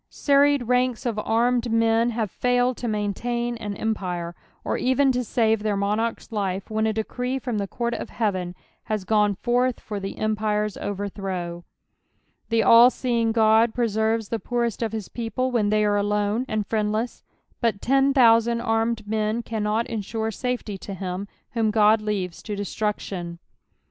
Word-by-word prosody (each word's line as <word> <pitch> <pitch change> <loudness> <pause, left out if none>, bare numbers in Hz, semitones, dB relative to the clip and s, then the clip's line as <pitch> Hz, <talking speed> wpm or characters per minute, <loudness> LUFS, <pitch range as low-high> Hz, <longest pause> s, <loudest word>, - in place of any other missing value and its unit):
Serried 285 -1 +3
ranks 250 0 +1
of 225 -3 -1
armed 235 +2 +1
men 225 +1 +3
have 220 -4 -2
failed 245 0 +1
to 245 - -4
maintain 235 +3 -2
on 205 -1 -4
empire, 180 -6 -3 0.3
or - - -1
even 265 +2 +2
to 250 0 -1
save 225 -2 +1
their 210 -1 0
monarch's 210 +5 -1
life 195 -2 -3
when 220 0 +1
a - - +2
decree 250 +4 -2
from 245 -4 -3
the 200 - -2
court 235 +3 -2
of - - -5
heaven 185 -5 -2 0.3
has 215 -2 -2
gone 210 0 +2
forth 245 +4 0
for 210 -2 -5
the 195 0 -6
empire's 210 -1 0
overthrow. 190 -4 -4 0.9
The 225 -1 +2
all 235 +2 +8
leeJDK 225 -3 +3
Ood 230 - -8
preserves 220 -2 0
the 230 - -2
poorest 235 +2 -2
of 225 -2 -1
his 220 -3 -5
people 240 +2 -2
when 220 -4 +1
they 215 0 +2
are 205 0 +2
olnne 210 +3 0
and 215 -1 -1
friend 210 -1 0
len, 220 +3 0 0.5
but 230 -4 0
ten 270 +3 +3
thousand 235 -3 +4
armed 225 -1 0
men 215 +2 -1
cannot 220 0 -1
ensure 220 0 -3
safety 230 -3 -3
to 195 - -7
him 185 +1 -4 0.2
whom 225 -2 +1
God 215 0 +4
lenves 195 -5 -3
to 210 - -3
destruction. 200 -4 -3
220 Hz, 165 wpm, -24 LUFS, 205-235 Hz, 0.9 s, all